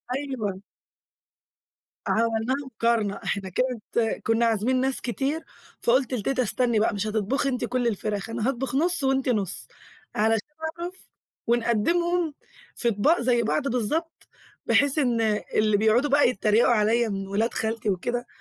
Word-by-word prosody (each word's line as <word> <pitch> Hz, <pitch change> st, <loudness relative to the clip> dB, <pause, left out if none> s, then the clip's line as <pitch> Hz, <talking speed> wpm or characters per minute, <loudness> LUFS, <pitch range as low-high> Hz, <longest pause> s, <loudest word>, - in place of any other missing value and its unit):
أيوه. 255 Hz, -9 st, -3 dB, 1.5 s
عملناها 230 Hz, +3 st, +1 dB
مقارنة، 230 Hz, -4 st, 0 dB
إحنا 195 Hz, -2 st, -2 dB
كانت 230 Hz, +1 st, -1 dB
كنا 225 Hz, +1 st, +2 dB
عازمين 230 Hz, +3 st, +1 dB
ناس 265 Hz, 0 st, 0 dB
كتير، 275 Hz, +6 st, -2 dB, 0.4 s
فقلت 255 Hz, +1 st, +2 dB
لتيتا: 255 Hz, +3 st, 0 dB
"استني 235 Hz, +1 st, +1 dB
بقى 215 Hz, -, +2 dB
مش 205 Hz, +2 st, -2 dB
هتطبخي 220 Hz, +6 st, 0 dB
أنتِ 250 Hz, -2 st, -1 dB
كُلّ 245 Hz, 0 st, 0 dB
الفراخ، 205 Hz, -1 st, -2 dB
أنا 230 Hz, +1 st, -2 dB
هاطبخ 270 Hz, 0 st, -2 dB
نُص، 335 Hz, +1 st, +2 dB
وأنتِ 265 Hz, -1 st, +1 dB
نُص 205 Hz, -6 st, -1 dB, 0.5 s
علشان 220 Hz, +2 st, +1 dB, 0.3 s
أعرف 350 Hz, +1 st, -4 dB, 0.5 s
ونقدّمهم 315 Hz, +9 st, +1 dB, 0.4 s
في 235 Hz, -, +1 dB
أطباق 235 Hz, +10 st, +2 dB
زي 240 Hz, -1 st, +2 dB
بعض 275 Hz, +5 st, 0 dB
بالضبط، 275 Hz, +8 st, -2 dB, 0.4 s
بحيث 285 Hz, +1 st, +3 dB
إن 245 Hz, -5 st, +1 dB, 0.3 s
اللي 215 Hz, -1 st, +3 dB
بيقعدوا 220 Hz, +7 st, +3 dB
بقى 285 Hz, -2 st, +5 dB
يتّريقوا 225 Hz, -1 st, +3 dB
عليَّ 225 Hz, +2 st, +2 dB
من 195 Hz, -1 st, -4 dB
ولاد 215 Hz, +4 st, 0 dB
خالتي 220 Hz, -1 st, -2 dB
وكده 240 Hz, +6 st, -2 dB
235 Hz, 135 wpm, -25 LUFS, 215-265 Hz, 1.5 s, بقى